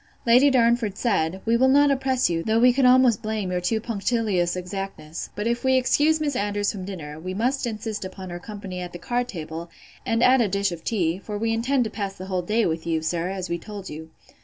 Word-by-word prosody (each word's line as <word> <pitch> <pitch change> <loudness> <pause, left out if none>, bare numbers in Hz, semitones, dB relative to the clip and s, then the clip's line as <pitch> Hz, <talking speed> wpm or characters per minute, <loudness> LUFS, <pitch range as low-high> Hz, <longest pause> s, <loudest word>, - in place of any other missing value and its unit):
Lady 250 +4 +6
Darnford 235 -5 +2
said, 190 -5 0
We 230 +1 +3
will 260 +3 +4
not 285 +2 +5
oppress 265 -1 +1
you; 165 -1 -1
though 220 +5 +1
we 245 +2 +5
could 265 +1 +2
almost 250 -3 +5
blame 215 -4 -3
your 180 0 -1
too 220 +5 0
punctilious 210 -5 0
exactness: 180 -4 -6
but 210 - -3
if 235 +1 -1
we 260 0 +3
excuse 295 +5 +3
Miss 290 -3 -1
Andrews 205 -1 0
from 190 -4 -7
dinner, 155 -6 -7
we 185 +3 -5
must 250 +4 0
insist 215 -2 -4
upon 185 -1 -8
her 175 - -5
company 200 -2 -7
at 180 -1 -7
the - - -6
card 245 +6 -2
table, 165 -2 -7 0.3
and 230 +1 +1
at 255 0 +6
a 225 - +2
dish 200 0 0
of 165 -1 -7
tea; 180 -5 0
for 210 +1 -6
we 225 +1 0
intend 250 +3 +1
to 220 - -4
pass 200 -3 -4
the 185 - -8
whole 185 -1 -1
day 215 +6 +1
with 165 0 -2
you, 160 -1 0
sir, 170 +2 -1
as 190 -1 -4
we 170 - -2
told 200 +1 -8
you. 160 +1 -8
205 Hz, 235 wpm, -24 LUFS, 180-240 Hz, 0.3 s, Lady